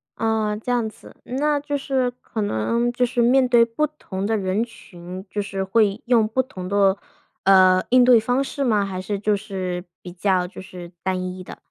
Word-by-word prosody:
啊， 220 -1 0
这 225 +3 -4
样 240 -3 +1
子， 215 - -13
那 290 +3 0
就 290 0 -3
是 265 -3 0
可 220 - -5
能 230 - 0
就 245 +1 +2
是 245 0 -1
面 255 +2 +4
对 235 -2 +6
不 240 +7 -1
同 200 -10 -6
的 220 +1 +1
人 190 +3 0
群， 185 -5 -10
就 205 - -2
是 200 -1 -3
会 205 +1 +2
用 235 -3 +3
不 260 +4 0
同 185 -7 -8
的， 200 -1 +3 0.5
呃， 185 -1 +6
应 250 0 +6
对 245 -2 +7
方 245 +5 0
式 275 +1 -4
吗？ 215 -6 +2
还 185 -1 -5
是 200 +2 -3
就 210 0 +1
是 185 -4 -4 0.2
比 180 - -8
较 185 0 +1
就 190 - -10
是 180 -2 -10
单 185 +1 -1
一 185 0 -6
的？ - - -10
215 Hz, 215 characters per minute, -22 LUFS, 190-245 Hz, 0.5 s, 对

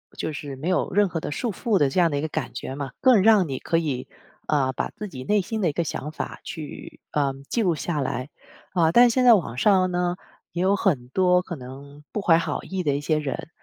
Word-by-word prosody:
就 - - -3
是 145 -2 -6
没 150 +7 -4
有 185 - +1
任 205 0 +3
何 170 - -3
的 150 - -5
束 235 +8 -2
缚 205 0 0
的 145 - +3
这 180 - 0
样 170 -3 +4
的 145 - -1
一 - - -1
个 155 - -1
感 130 - -4
觉 130 +2 -5
嘛， 140 -2 -5
更 235 -7 +5
让 215 -5 +5
你 130 - -3
可 165 +4 0
以， 140 -6 -3 0.4
呃， 140 -3 +2
把 - - -2
自 210 - -7
己 130 -9 -8
内 210 +5 +2
心 220 +4 -4
的 175 - +2
一 - - -1
个 170 +4 -1
想 150 -1 -4
法 - - -6
去， 155 -3 -8
呃 140 -2 +1 0.2
记 235 - +1
录 175 -4 +2
下 155 0 -3
来。 130 0 -3 0.4
啊， 165 -3 +3
但 240 +6 +7
现 250 +2 +2
在 240 - +9
网 160 - 0
上 185 +3 +4
呢， 175 0 0 0.4
有 185 +3 +2
很 125 -10 0
多 180 +3 +3
可 180 -2 -6
能 140 +3 -11
不 210 - -2
怀 165 -4 +5
好 165 -3 -2
意 190 -1 -4
的 145 -3 +1
一 140 - -2
些 155 +1 +1
人， 150 +1 -4
165 Hz, 265 characters per minute, -24 LUFS, 145-190 Hz, 0.4 s, 在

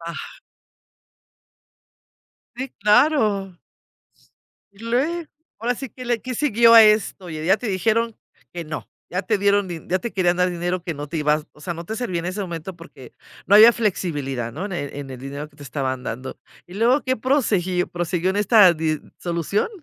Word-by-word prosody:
Ah. 170 - -8 2.2
Sí, 265 +1 -4
claro. 210 - +3 1.2
Y 195 - -23
lue 275 +9 -1 0.3
ahora 240 +3 -1
sí 265 +1 -7
que 255 +3 -10
le 235 -2 0
que 255 -1 -5
siguió 235 -4 +4
a 225 -1 +10
esto. 210 -3 +2
Oye, 160 -2 -6
ya 190 +4 +4
te 230 - -5
dijeron 220 +3 0 0.4
que 175 - -5
no, 155 -1 -6 0.2
ya 185 +2 -2
te 210 +2 0
dieron 200 0 +2
din 170 -3 -8
ya 185 +1 +1
te 235 - -5
querían 180 -2 +1
dar 180 0 +2
dinero 175 +1 -2
que 170 -2 -3
no 145 0 -7
te 165 - -4
ibas 150 0 +1
o 150 - -19
sea, 175 - -4
no 170 +1 -8
te 220 - -5
servía 205 -7 -2
en 170 - -6
ese 185 +3 -3
momento, 175 0 -6
porque, 165 -6 -14 0.3
no 200 - +6
había 220 +2 +10
flexibilidad, 145 - -2
¿no? 170 +10 -5
En 205 - -6
el 145 -5 -4
en 140 -1 -7
el 130 -2 -8
dinero 140 +3 -7
que 145 - -26
te 145 - -12
estaban 130 -1 -3
dando, 130 +3 -6 0.3
¿y 175 - -13
luego 240 +7 +3
qué 260 0 0
prosiguió- 205 -9 +1
prosiguió 175 +1 -2
en 190 - -1
esta 210 -3 +6
di 155 -1 -1 0.2
solución? 175 - -1
185 Hz, 190 wpm, -22 LUFS, 160-220 Hz, 2.2 s, a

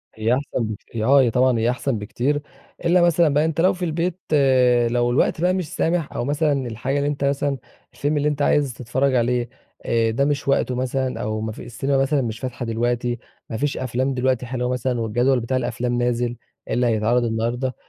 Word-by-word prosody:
هي 110 +2 +1
احسن 130 -2 -1
بكت 110 +1 -9
آه 125 +3 +4
طبعًا 125 0 +2
هي 115 +2 +2
احسن 125 0 -1
بكتير، 135 +8 -1 0.4
إلا 175 +1 +4
مثلًا 170 -1 +4
بقى 150 +2 +2
أنت 160 0 0
لو 185 - +4
في 180 0 -3
البيت 170 +2 -2 0.7
لو 120 0 +2
الوقت 135 +5 +1
بقى 180 +1 +3
مش 185 -5 -3
سامح، 165 -2 0
أو - - -2
مثلًا 145 -2 0
الحاجة 125 +5 -2
اللي 140 - 0
أنت 145 -1 -2
مثلًا، 140 0 0 0.4
الفيلم 145 +1 -1
اللي 145 0 +1
أنت 150 -1 -1
عايز 140 -4 +2
تتفرّج 130 +3 0
عليه 120 0 +1 0.4
آآ 115 -1 +2
ده 135 +5 +1
مش 145 -1 -1
وقته 135 -2 +1
مثلًا، 130 +1 -2
أو 110 0 -2
ما 110 0 -3
في - - -9
السينما 135 +3 -1
مثلًا 135 +1 +2
مش 110 -3 -4
فاتحة 125 -1 -5
دلوقتي، 120 +1 -1 0.3
ما 110 - -3
فيش 145 +4 -1
أفلام 130 +2 -1
دلوقتي 130 -1 0
حلوة 125 0 -2
مثلًا 125 -1 -1
والجدول 120 +4 +2
بتاع 125 +3 -1
الأفلام 120 0 -2
نازل، 120 0 0 0.3
إيه - - -3
اللي 125 0 +2
هيتعرض 115 +2 +2
النهارده، 120 +3 -1
125 Hz, 200 wpm, -22 LUFS, 120-140 Hz, 0.7 s, آه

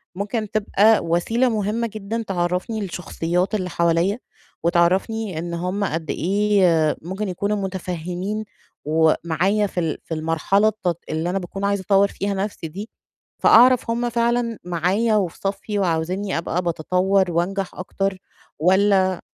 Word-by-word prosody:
ممكن 210 +3 -2
تبقى 215 +1 +4
وسيلة 225 +10 +1
مهمة 220 +2 -1
جدًا 215 +2 -4
تعرّفني 180 +4 -1
الشخصيات 180 +2 -2
اللي 185 -3 -2
حواليّا، 170 +6 +1 0.4
وتعرّفني 180 +3 +1
إن 170 +1 -5
هم 180 +4 -2
قد 160 -2 -3
إيه 185 -4 +2
ممكن 190 +5 -4
يكونوا 200 +3 -1
متفهّمين 185 +2 -4 0.4
ومعايا 165 +6 +2
في 185 - -4
ال 165 -3 -1
في - - -6
المرحلة 165 +6 +1
الت 185 -6 -1
اللي 160 +2 -1
أنا 190 +2 0
باكون 195 +2 -5
عايزة 200 -1 0
أطوَّر 195 +1 +4
فيها 200 0 -3
نفسي 195 -3 -3
دي، 200 +8 -8 0.5
فأعرف 245 +1 +6
هم 240 +1 0
فعلًا 235 -1 0
معايا 180 +6 +1
وفي 190 -5 0
صفّي 200 +1 -3
وعاوزينّي 185 +2 -1
أبقى 170 +1 -1
باتطوَّر 180 +3 +1
وأنجح 185 +3 -1
أكتر 195 +1 -2 0.4
والَّا 190 +1 +3
190 Hz, 135 wpm, -22 LUFS, 175-210 Hz, 0.5 s, فأعرف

